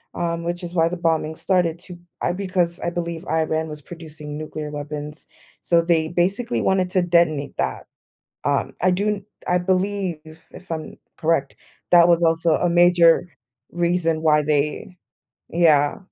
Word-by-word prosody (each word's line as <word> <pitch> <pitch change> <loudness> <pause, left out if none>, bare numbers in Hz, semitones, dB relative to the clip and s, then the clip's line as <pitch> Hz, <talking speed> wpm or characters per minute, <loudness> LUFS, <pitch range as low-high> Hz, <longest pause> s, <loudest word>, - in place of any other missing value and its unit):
um, 170 -1 -2
which 175 +1 -4
is 175 0 -6
why 165 -1 +3
the 180 - -4
bombing 160 -2 0
started 175 -3 0
to 180 -1 -11 0.2
I - - +1
because, 180 -2 -1
I 170 - -2
believe, 170 -1 -5
Iran 160 0 0
was 150 -1 -8
producing 150 -2 -9
nuclear 155 -1 -6
weapons, 150 +1 -7 0.4
so, 170 -1 +3
they 165 -2 +1
basically 195 +8 0
wanted 185 -1 +1
to 185 - +2
detonate 170 -4 +1
that. - - -2 0.6
Um, - - 0
I 185 - +4
do 200 +3 0
n 200 -1 -2 0.2
I 180 0 +3
believe, 185 -1 -1 0.3
if 180 -1 -14
I'm 160 -1 -5 0.2
correct, 155 -4 0 0.3
that 175 -1 +7
was 170 0 +4
also 165 0 +2
a 175 - +1
major 175 0 +5 0.4
reason 170 -2 0
why 150 -1 +4
they 150 +4 -1 0.5
yeah. 155 -4 +3
170 Hz, 155 wpm, -22 LUFS, 155-180 Hz, 0.6 s, that